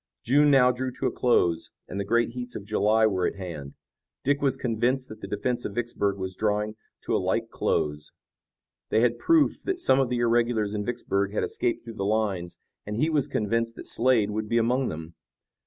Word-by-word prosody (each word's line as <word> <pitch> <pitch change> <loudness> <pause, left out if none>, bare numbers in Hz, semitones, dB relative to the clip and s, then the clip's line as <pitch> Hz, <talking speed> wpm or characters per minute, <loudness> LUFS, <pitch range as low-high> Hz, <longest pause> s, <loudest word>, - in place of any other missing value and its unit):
June 145 +4 +4
now 130 -3 +6
drew 130 +1 -3
to - - -5
a - - +2
close 85 -9 +2 0.2
and 100 - -5
the - - 0
great 120 +3 +2
heats 125 +1 -7
of 100 - -6
July 110 +1 +3
were 95 -4 +1
at - - -4
hand. 85 -8 -7 0.5
Dick 140 +1 +1
was 135 -2 +1
convinced 125 +2 0
that 110 0 -10
the - - -6
defense 120 +4 -2
of 100 - -5
Vicksburg 100 -4 -1
was 95 -1 -4
drawing 105 +1 -1 0.3
to - - -1
a - - +1
like - - -1
close. 75 0 -1 0.8
They 110 - +3
had 120 0 +2
proof 325 -3 +3
that 380 -2 -2
some 130 - +4
of 135 -3 +2
the 125 - 0
irregulars 115 -3 +1
in 105 -1 -2
Vicksburg 100 -5 -1
had - - 0
escaped 120 -1 -1
through 115 -1 -9
the 100 - -2
lines 100 -4 -1 0.3
and 105 - -5
he 155 +8 +1
was 145 -4 +1
convinced 115 +2 -1
that - - -9
Slade 115 -4 +2
would 105 0 -3
be 115 - +2
among 125 +3 +2
them. 80 +1 -7
115 Hz, 205 wpm, -26 LUFS, 100-125 Hz, 0.8 s, now